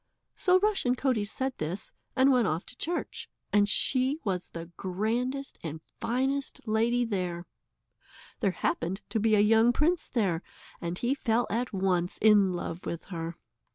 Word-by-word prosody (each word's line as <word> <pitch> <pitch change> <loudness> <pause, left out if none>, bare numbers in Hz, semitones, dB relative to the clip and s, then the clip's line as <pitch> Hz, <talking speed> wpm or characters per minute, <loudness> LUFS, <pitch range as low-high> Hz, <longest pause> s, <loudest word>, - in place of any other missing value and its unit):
So 370 -1 +3
Rushen 395 -12 +2
Coatie 250 -6 0
said 265 +5 -2
this, 160 +6 -4 0.2
and 265 +1 +5
went 245 -5 +3
off 165 +1 -1
to - - -12
church, 340 +6 -4 0.2
and 205 0 +4
she 260 +6 +3
was 185 -4 -2
the 165 0 -8
grandest 235 +9 -2
and 160 -1 -5 0.2
finest 265 +3 -1
lady 235 +3 +2
there. 180 -5 -3 0.9
There 205 - +2
happened 185 +1 -2
to 220 +2 0
be 215 0 +3
a - - +4
young 225 +3 +5
prince 320 +7 +1
there, 190 -9 0 0.4
and 170 +1 -3
he 240 +6 +1
fell 240 -3 +1
at 240 +4 -1
once 185 -3 0
in 205 -3 +5
love 175 -1 -4
with 170 +2 -5
her. 165 0 -4
220 Hz, 155 wpm, -29 LUFS, 180-255 Hz, 0.9 s, and